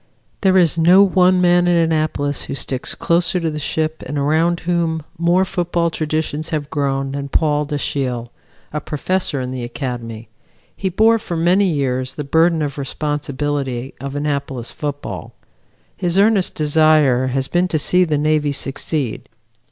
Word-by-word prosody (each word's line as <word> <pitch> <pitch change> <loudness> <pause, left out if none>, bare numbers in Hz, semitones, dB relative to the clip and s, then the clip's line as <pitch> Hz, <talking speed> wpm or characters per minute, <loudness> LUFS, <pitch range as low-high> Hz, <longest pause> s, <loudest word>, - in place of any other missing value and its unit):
There 190 -1 +4
is 170 -2 +3
no 180 +4 +7
one 185 -1 +3
man 175 0 +4
at 175 -1 +3
Annapolis 155 -3 0
who - - -5
sticks 130 -2 -2
closer 175 +2 +1
to 165 -2 -1
the 150 - -4
ship 155 +1 -2
and 145 +3 -4
around 160 +4 +1
whom 165 -2 -1 0.2
more 175 +3 +3
football 175 -2 -1
traditions 155 0 -2
have 150 -2 -3
grown 135 -2 -1
than 140 0 -5
Paul 150 0 +1
Dashiell, 130 -5 -3 0.4
a 150 - -2
professor 150 +1 -2
in 130 0 -4
the 130 -1 -4
Academy. 120 -2 -5 0.5
He 190 - -2
bore 225 +5 +3
for 175 -6 -5
many 180 +5 +3
years 130 -6 -1
the 150 - -4
burden 160 +2 +2
of 145 -1 -4
responsibility 140 -2 -3
of 140 0 -5
Annapolis 140 -4 -3
football. 145 -1 -6 0.6
His 180 -1 -1
earnest 200 -2 +3
desire 150 -4 +3
has 130 +1 -1
been 175 +4 +1
to 165 - 0
see 180 +4 +3
the 155 -4 0
Navy 150 -1 +1
succeed. 135 -2 -3
150 Hz, 155 wpm, -19 LUFS, 140-170 Hz, 0.6 s, no